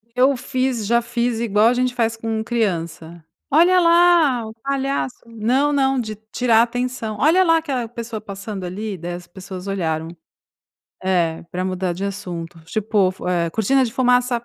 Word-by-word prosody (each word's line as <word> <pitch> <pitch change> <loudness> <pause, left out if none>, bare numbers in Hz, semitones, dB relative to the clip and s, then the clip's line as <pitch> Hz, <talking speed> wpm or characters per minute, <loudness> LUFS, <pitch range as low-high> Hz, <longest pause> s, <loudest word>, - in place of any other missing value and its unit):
Eu 260 +2 +4
fiz 255 -3 -1
já 235 +1 +3
fiz 235 0 -1
igual, 220 -1 +3
a 245 - +4
gente 250 0 0
faz 230 -2 0
com 225 -1 -2
criança: 170 -7 -3 0.3
"Olha 345 +5 +5
lá 335 -8 +4
o 220 - -9
palhaço". 275 -2 -1
Não, 240 +6 +1
não 270 -1 +2
de 215 -2 -4 0.2
tirar 235 -3 +3
a - - +7
atenção. 240 -3 -3
"Olha 340 +6 +5
lá 330 -2 +4
aquela 265 -7 -2
pessoa 230 -2 -6
passando 200 -1 -7
ali", 200 +2 -5
daí 175 +1 -5
as 175 0 -8
pessoas 185 +1 -9
olharam. 160 -5 -2 1.0
É, 175 -3 0
pra 180 +1 -2
mudar 185 -1 -1
de 185 +3 -4
assunto. 175 -4 -6
Tipo 200 +1 +1
fu 180 - -6
eh, 170 -2 0
"Cortina 255 +8 +2
de 230 - -4
fumaça", 245 -1 +2
225 Hz, 170 wpm, -21 LUFS, 190-255 Hz, 1.0 s, a